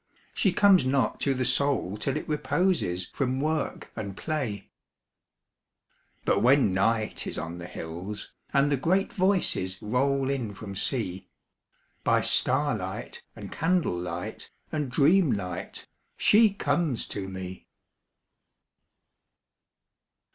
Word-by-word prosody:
She 195 - +2
comes 195 -2 +5
not 130 -3 +1
to 135 -1 +1
the 130 0 0
Soul 135 -8 +2
till 135 +5 -2
it - - -6
reposes 150 - 0
From 130 -1 -1
work 155 +1 -2
and 100 -3 -5
play. 135 -10 -3 1.5
But - - +3
when 125 -4 +4
Night 110 +3 0
is - - -4
on 80 +2 -5
the 85 - -7
hills, 90 +6 -7 0.2
and 140 +1 +3
the 140 - +2
great 185 +8 +1
Voices 185 - +1
Roll 135 +4 +1
in 120 -7 -3
from 100 -1 -8
Sea, 95 -3 -2 0.7
By - - +3
starlight - - 0
and - - -9
candle 175 - +1
light 90 0 -5 0.2
and 150 -4 -2
dreamlight 140 - +1 0.3
She 220 +1 +6
comes 170 - 0
to 95 -1 -4
me. 95 -1 -7
130 Hz, 115 wpm, -27 LUFS, 95-150 Hz, 1.5 s, She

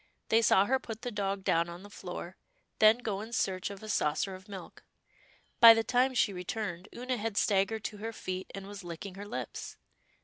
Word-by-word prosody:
They 225 +1 +5
saw 200 -3 +5
her 265 +4 +2
put 225 -3 -8
the 245 - -3
dog 200 -2 -2
down 170 -1 +2
on 170 +2 -9
the 205 - -11
floor, 180 -1 -7 0.4
then 215 +1 +7
go 215 -5 -3
in 225 +2 -8
search 185 -4 0
of 200 +1 -9
a - - -7
saucer 190 -1 0
of 185 +2 -12
milk. 190 -3 -9 0.8
By 230 -1 +11
the 225 - +1
time 255 +2 +2
she 210 -4 +3
returned, 180 0 -4
Oonah 250 +1 -3
had 220 -1 -3
staggered 205 +2 +2
to 210 - -4
her 225 +2 -4
feet, 185 -4 -5
and 195 -1 -7
was 200 -1 -9
licking 175 +3 -7
her 200 +2 -8
lips. 210 - -6
205 Hz, 205 wpm, -31 LUFS, 185-225 Hz, 0.8 s, By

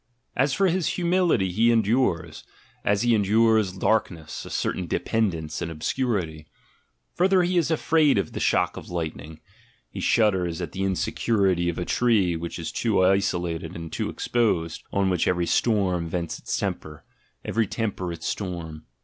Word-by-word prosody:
As 135 +2 +2
for 195 - +2
his 185 -1 +1
humility, 175 - +2
he 115 +6 +3
endures, 115 -5 +1 0.4
as 100 +2 +1
he 120 -1 +3
endures 110 -1 +3
darkness, 90 -5 -1
a - - -8
certain 90 -2 -2
dependence 85 -6 -1
and 85 - -2
obscurity: 80 - -2 0.7
further, 185 0 +3
he 180 +1 0
is 170 -3 +2
afraid 155 -3 +3
of 100 - -1
the - - -5
shock - - +1
of - - -9
lightning, 80 -2 -5 0.5
he - - -7
shudders 95 -6 +2
at 85 -4 -4
the 95 - -5
insecurity 95 -1 +1
of 85 - -4
a 90 - -2
tree 105 -8 +2
which 85 +1 -5
is 85 -2 -5
too 105 -5 +2
isolated 90 -3 0
and 85 -1 -7
too - - -2
exposed, 90 -9 0
on 100 -1 +1
which 90 - +1
every 90 -1 +1
storm 95 -6 +1
vents 85 -1 -3
its - - -3
temper, 75 -1 -5 0.4
every 115 -1 0
temper 95 -6 -3
its 85 - -7
storm. 85 -5 -5
95 Hz, 160 wpm, -25 LUFS, 85-115 Hz, 0.7 s, he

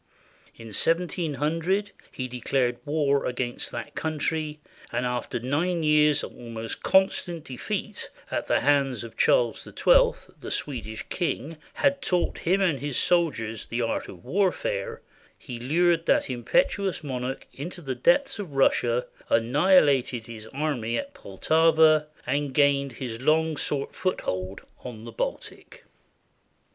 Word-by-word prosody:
In 115 0 -11
1700 165 - 0 0.2
he 130 - -4
declared 125 0 -1
war 145 -2 +1
against 125 -1 -3
that - - -6
country, 155 -1 -2 0.3
and 120 +1 -1
after 125 -1 -2
nine 160 +8 0
years 150 -1 +4
of - - -7
almost 115 -2 -6
constant 180 -4 +2
defeat 130 -5 -5 0.2
at - - -2
the - - +2
hands 135 -4 +2
of 115 - -10
Charles - - +3
XII, - - +2
the - - -7
Swedish 110 -6 -4
king, 165 -3 -2 0.2
had 280 -1 +2
taught 180 -2 0
him 190 +4 +1
and 170 -8 +2
his 145 -1 -2
soldiers 130 - +1
the 120 +1 -1
art 115 - -2
of 90 -3 -12
warfare, 460 - -1 0.3
he 125 -4 -8
lured 165 +6 +2
that - - +2
impetuous 165 - 0
monarch 130 -2 -4
into 175 +6 -7
the 135 -6 -4
depths 260 - +2
of 180 -8 -6
Russia, 125 -3 +2 0.2
annihilated 135 -1 +3
his 110 -2 -9
army 130 -5 -2
at 280 0 -5
Poltava, 155 - +3 0.2
and 140 +1 -1
gained 140 -2 +3
his 120 -1 -6
long 160 +3 +2
sought 140 -1 -2
foothold 95 - -3 0.2
on 115 -3 -8
the 115 - -8
Baltic. 115 - -5
145 Hz, 130 wpm, -26 LUFS, 125-165 Hz, 0.3 s, years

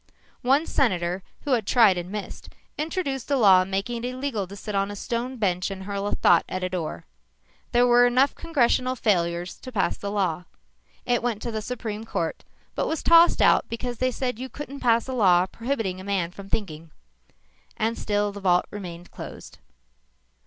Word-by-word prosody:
One 275 +5 +3
senator, 185 - 0 0.2
who 290 - -4
had 230 -5 +1
tried 225 -6 +5
and 175 0 -5
missed, 210 -1 -7 0.3
introduced 300 -5 -3
a 280 - +2
law 190 -6 +6
making 195 +5 -3
it 245 - -1
illegal 255 -6 -3
to 200 - -10
sit 210 +1 -6
on 195 0 0
a 205 - -6
stone 240 +5 -3
bench 185 -4 0
and 190 -1 -6
hurl 200 0 -3
a - - -1
thought 170 -1 +4
at 185 0 -3
a 185 - -1
door. 165 - -4 0.7
There 240 +1 +4
were 245 0 +6
enough 255 +3 +3
congressional 255 -4 +1
failures 175 -6 0
to 255 - -9
pass 210 -6 0
the 200 - -4
law. 185 -4 -1 0.6
It 245 -1 +1
went 235 -3 -1
to 235 - -3
the 220 -1 -3
Supreme 220 -2 -5
Court, 165 -7 -3 0.3
but - - -1
was 320 - -2
tossed 335 +1 +6
out - - +4
because 240 +1 -4
they 255 - +2
said 250 -2 -3
you 260 +1 -5
couldn't 280 0 -8
pass 230 -1 +2
a 260 - -4
law 185 -7 +4
prohibiting 225 -4 -3
a - - -10
man 190 -3 -1
from 195 +1 -11
thinking. 165 -7 -4 0.9
And 225 +1 0
still 205 -2 -1
the 200 0 -9
vault 180 -2 +3
remained 175 -4 -8
closed. - - -10
215 Hz, 190 wpm, -25 LUFS, 185-250 Hz, 0.9 s, law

